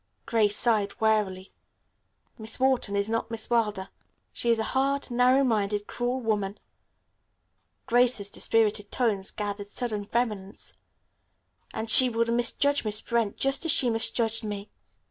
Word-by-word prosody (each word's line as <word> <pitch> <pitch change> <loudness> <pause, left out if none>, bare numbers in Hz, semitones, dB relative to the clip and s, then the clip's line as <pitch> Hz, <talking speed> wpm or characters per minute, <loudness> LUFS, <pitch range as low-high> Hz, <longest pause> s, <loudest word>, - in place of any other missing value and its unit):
Grace 210 -3 +2
sighed 215 -4 +1
wearily. 210 -4 0 0.9
"Miss 220 +3 -6
Wharton 260 -6 +1
is 200 0 0
not 230 +1 -2
Miss 230 0 -4
Wilder. 210 -5 0 0.4
She 240 - -2
is 230 - +4
a 220 - -1
hard, 275 0 0
narrow 250 +3 +4
minded, 210 -4 0
cruel 245 +3 -2
woman," 210 -4 -2 1.3
Grace's 240 -4 +1
dispirited 210 -2 0
tones 210 -6 0
gathered 205 -1 -5
sudden 210 -1 -3
vehemence, 210 -4 -3 1.0
"and 220 - -5
she 255 +3 +7
would 230 0 0
misjudge 260 +4 +1
Miss 215 -1 0
Brent 230 -3 -1
just 270 +3 0
as 330 - +3
she 245 -4 +3
misjudged 225 0 0
me. 205 -1 -6
225 Hz, 135 wpm, -27 LUFS, 205-240 Hz, 1.3 s, she